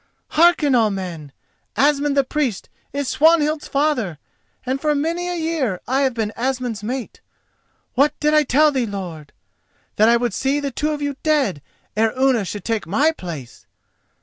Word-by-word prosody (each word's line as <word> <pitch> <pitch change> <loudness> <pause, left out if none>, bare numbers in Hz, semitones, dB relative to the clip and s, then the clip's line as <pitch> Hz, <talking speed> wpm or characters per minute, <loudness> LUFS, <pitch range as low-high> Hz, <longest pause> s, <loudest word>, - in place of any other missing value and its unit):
Hearken 320 -3 +4
all 230 -3 +4
men. 175 -7 -6 0.5
Asmund 285 0 +2
the 275 - +5
Priest 260 -6 -2 0.2
is 280 0 -3
Swanhild's 310 0 +3
father, 275 - 0 0.5
and 265 +2 -2
for 300 -1 +1
many 335 +5 -1
a 355 - -2
year 315 - -1
I 265 +2 +1
have 265 -3 +1
been 220 -2 -2
Asmund's 250 -3 -2
mate. 245 +3 -5 0.7
What 290 +4 +2
did 300 0 +2
I 305 - +6
tell 300 +2 +3
thee, 260 -4 -1
lord?—that 190 +3 -4
I 235 - +5
would 240 0 -1
see 275 +2 0
the 280 -1 -3
two 300 +5 -1
of 295 -1 -3
you 285 -1 -3
dead 280 - +1 0.3
ere 220 +1 +2
Unna 260 -5 +2
should 205 +1 -6
take 225 -5 -2
my 280 - +3
place! 165 - -9
265 Hz, 165 wpm, -21 LUFS, 215-300 Hz, 0.7 s, I